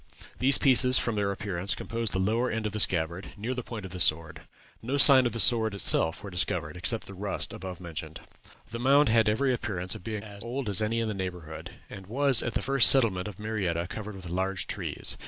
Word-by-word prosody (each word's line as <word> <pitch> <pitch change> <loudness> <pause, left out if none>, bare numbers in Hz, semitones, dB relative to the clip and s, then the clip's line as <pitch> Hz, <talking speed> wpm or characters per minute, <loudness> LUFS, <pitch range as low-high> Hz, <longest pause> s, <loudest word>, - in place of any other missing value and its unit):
These 135 +1 +4
pieces, 130 -1 +5
from 115 - -1
their 100 -1 -1
appearance, 100 -1 -3
composed 115 0 -4
the - - -3
lower 115 +6 0
end 115 -1 -4
of 105 - -3
the 110 - -3
scabbard, 85 0 -1
near 115 +5 -4
the 125 - -5
point 115 -4 -8
of 95 - -10
the 90 - -8
sword. 80 -1 +2 0.4
No 130 +5 -3
signs 135 -3 +7
of 120 - -6
the 115 - -4
sword 110 -2 +5
itself 85 -2 +1
were 100 - -8
discovered, 85 -4 -3
except 110 +6 -3
the 100 - -10
rust 100 +1 -5
above 90 -1 -8
mentioned. 80 -3 -8 0.5
"The 115 - -6
mound 140 +3 +3
had 110 -1 +3
every 130 +5 0
appearance 95 -7 -4
of - - -11
being 110 0 -6
as 100 -1 -11
old 120 0 -5
as 100 +1 +2
any 115 +2 -1
in 115 - -2
the 110 - -3
neighborhood, 90 -4 -8
and 95 -1 -12
was 135 +2 +2
at 120 - -4
the - - -1
first 135 -5 +5
settlement 105 -9 +4
of 105 -4 -10
Marietta 100 -6 -3
covered 105 -1 -8
with 95 -2 -10
large 95 +1 -3
trees. - - -3
105 Hz, 225 wpm, -27 LUFS, 90-115 Hz, 0.5 s, signs